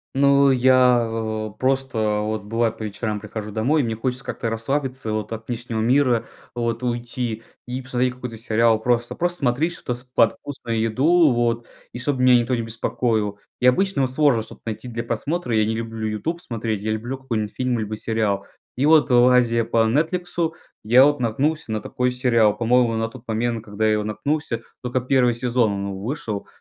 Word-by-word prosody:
Ну, 140 0 +5
я, 130 -1 +5
а, 110 -1 -3
просто, 130 -5 0
вот, 110 -1 -3
бывает, 115 +1 -1
по 110 - -6
вечерам 105 0 -3
прихожу 105 0 -6
домой, 130 +9 +1
мне 115 -3 -2
хочется 125 +3 -3
как-то 115 - -3
расслабиться 130 0 -2
вот, 110 0 -3
от 115 0 -6
внешнего 120 -2 -4
мира 125 0 +2 0.3
вот 115 0 -2
уйти, 120 -1 -3 0.2
и 125 +1 -4
посмотреть 125 0 -1
какой-то 125 -2 -7
сериал. 115 0 +3
Просто, 120 0 0
просто 175 0 -1
смотреть 140 +6 0
что-то 125 -7 -4
с 125 - -8
под 125 -3 +2
вкусную 115 -5 -3
еду 145 +8 +4
вот, 120 -1 0 0.3
и 120 - -6
чтобы 130 -1 -1
меня 125 -1 +7
никто 120 +2 -1
не 115 - -1
беспокоил. 115 -2 -1 0.2
И - - +1
обычно 190 +4 +2
вот 130 -1 0
сложно 140 -4 +3
что-то 110 - -12
найти 115 +2 -5
для 115 0 -4
просмотра. 125 +2 -2
Я 110 - +3
не 110 +1 -1
люблю 115 -1 -4
"Ютуб" 165 +11 -3
смотреть, 110 - -3
я 110 - -2
люблю 120 +5 -3
какой-нибудь 115 -5 -3
фильм 125 -2 0
либо 110 0 -3
сериал. 105 -3 -1 0.3
И 135 +4 +1
вот, 155 -2 +5
лазея 120 -1 +4
по 115 0 +2
"Нетфликсу", 165 +5 0 0.3
я 125 +5 +6
вот 145 -3 +1
наткнулся 135 +4 -1
на 110 - -1
такой 125 +3 -1
сериал. 115 -4 +2
По-моему, 120 0 +2
на 115 0 0
тот 115 - -13
момент, 115 0 -1
когда 105 0 -2
я 110 - +4
его 105 - 0
наткнулся, 115 +2 -2 0.2
только 125 +1 0
1 125 -1 +2
сезон 120 -3 +1
он 100 0 -3
вышел. 115 -5 -4
120 Hz, 185 wpm, -22 LUFS, 110-130 Hz, 0.3 s, меня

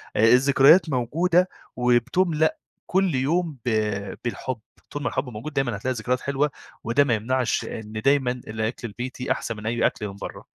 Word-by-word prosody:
آآ - - +2
الذكريات 140 +6 +6
موجودة 165 +8 +2 0.3
وبتُملأ 150 +7 +2 0.3
كل 185 -5 +2
يوم 155 +3 0
ب - - +1 0.6
بالحُب. 120 0 -3 0.3
طول 145 0 -4
ما - - 0
الحُب 130 -1 -2
موجود 125 +7 -7
دايمًا، 135 -5 0
هتلاقي 130 +6 -2
ذكريات 125 +3 -1
حلوة 140 +1 0 0.3
وده 120 +5 +3
ما 125 - +1
يمنعش 125 +3 0
إن 110 -1 -7
دايمًا 135 -3 +3
الأكل 110 -1 -4
البيتي 125 +4 -5
أحسن 115 -2 -2
من 105 - -9
أي 115 +1 +1
أكل 105 - -4
من 100 - -8
برّه. - - -8
130 Hz, 165 wpm, -24 LUFS, 120-145 Hz, 0.6 s, الذكريات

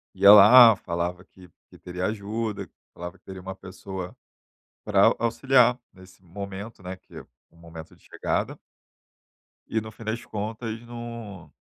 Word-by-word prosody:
ia 100 - +7
lá, 110 +2 +9
falava 90 +1 -4
que 90 -1 -18 0.2
que - - -17
teria 90 +1 -5
ajuda, 105 -2 -4 0.2
falava 85 0 -8
que - - -54
teria 95 -1 -9
uma 95 +1 -7
pessoa 95 -1 -8 0.7
pra - - +4
auxiliar 125 +1 +2
nesse 95 0 -18
momento, 100 +3 -9
né, 90 +1 -6
que 95 - -16 0.3
o - - -28
momento 85 -1 -12
de - - -28
chegada. - - -3 1.1
E 110 - -1
no 110 0 -9
fim 115 - -13
das 110 +2 -4
contas 110 +2 -5
não 115 -9 -9
100 Hz, 145 wpm, -25 LUFS, 90-115 Hz, 1.1 s, lá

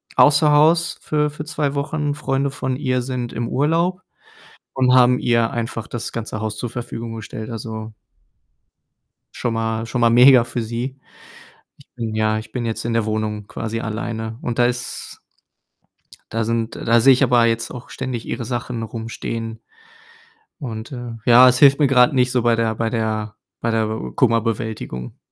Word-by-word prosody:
außer 150 +1 +5
Haus 160 +3 +3
für 150 -1 0
für 150 +1 -7
2 150 -2 -1
Wochen. 145 +1 -2
Freunde 140 -1 -1
von 130 -2 -3
ihr 130 -2 0
sind 125 -1 -4
im 115 +1 -3
Urlaub 170 +6 +1 0.7
und 130 -1 +3
haben 125 0 +5
ihr 115 -1 +2
einfach 115 -1 -4
das 120 - -5
ganze 110 -1 -4
Haus 110 -1 -3
zur 120 0 -4
Verfügung 115 -1 -6
gestellt. 110 +1 -7
Also 110 -1 -6 1.4
schon 120 -2 -2
mal 115 0 -2
schon 120 +1 -3
mal 115 - +5
mega 125 +1 +7
für 120 +1 -4
sie. 120 +4 -4 0.8
Ich - - -20
bin 115 -2 -4
ja 110 0 +1
ich 110 - -11
bin 120 -2 -3
jetzt 115 0 -3
in 120 - -1
der 115 -2 +1
Wohnung 105 -1 -3
quasi 115 0 -4
alleine 110 0 -4
und 120 0 -3
da 120 - +5
ist 120 -1 -4 1.1
da 115 0 0
sind 115 0 -2
da 115 0 +2
sehe 135 +4 +7
ich 130 +2 +2
aber 120 -2 +4
jetzt 115 0 0
auch 125 -1 -9
ständig 130 -3 -5
ihre 120 - -4
Sachen 120 -1 -4
rumstehen 115 0 -5 1.0
und, 115 -4 -6
äh 120 -2 -6
ja, 125 +1 +8
es 125 - +3
hilft 140 0 +6
mir 145 - +5
grad 125 -1 +5
nicht 125 -1 +2
so 125 -1 +1
bei 115 -1 +3
der 115 -1 0
bei 115 0 -1
der 110 -2 -2 0.2
bei 115 - -1
der 110 -1 +1
Be 105 - -5
Kummerbewältigung. 110 - -1
120 Hz, 175 wpm, -21 LUFS, 115-130 Hz, 1.4 s, ja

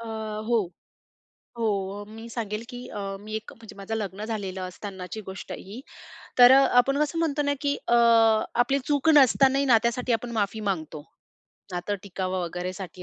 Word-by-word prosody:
अ, 230 - -8 0.4
हो, 235 - +3 1.0
हो, 225 -1 0 0.5
मी 225 +1 -9
सांगेल, 220 -2 -4
की 245 0 -8
अ, 210 - -7 0.2
मी 215 +1 -9
एक 220 0 -6
म्हणजे 225 -1 -13
माझं 200 +3 -5
लग्न 205 -1 -4
झालेलं 200 -4 -4
असतानाची 190 +2 -7
गोष्ट 190 - -8
ही 210 +7 -8 0.6
तर 245 +1 +10
आपण 275 0 +4
कसं 315 +2 -1
म्हणतो 300 -3 0
ना, 285 0 +1
की 285 -1 0
अ, 240 - +4 0.7
आपली 275 +3 0
चूक 290 +2 +2
नसतानाही 275 0 +5
ना 240 -4 +6
त्यासाठी 235 +1 0
आपण 235 +1 -2
माफी 215 -1 -1
मागतो. 155 -4 -6 0.7
नातं 180 +3 -2
टिकावं 185 -1 -3
वगैरेसाठी 180 +1 -6
225 Hz, 155 wpm, -26 LUFS, 195-255 Hz, 1.0 s, तर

